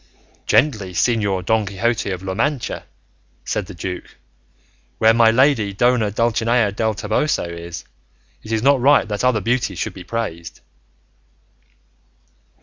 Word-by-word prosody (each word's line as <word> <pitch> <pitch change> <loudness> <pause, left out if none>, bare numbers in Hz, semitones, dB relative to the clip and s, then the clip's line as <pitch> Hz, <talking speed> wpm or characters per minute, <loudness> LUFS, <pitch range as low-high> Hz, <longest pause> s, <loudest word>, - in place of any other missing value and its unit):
"Gently, 105 -10 +2
Señor 100 -1 0
Don 110 +2 +2
Quixote 105 +3 -1
of 95 -1 -4
La 95 0 -3
Mancha," 130 +5 -2 0.6
said 105 -4 -2
the 100 - -10
duke; 90 +2 -6 0.8
"where 110 0 +5
my 115 0 +5
lady 115 -4 +3
Dona 120 0 +2
Dulcinea 115 0 +1
del 110 +1 -1
Toboso 110 +9 0
is, 85 0 -8 0.6
it 110 - -10
is 110 0 0
not 140 -1 +4
right 140 -1 +4
that 105 +1 -3
other 125 -4 +2
beauties 115 -3 -1
should - - -3
be 95 - -10
praised." 85 -6 -5
110 Hz, 135 wpm, -20 LUFS, 95-120 Hz, 0.8 s, where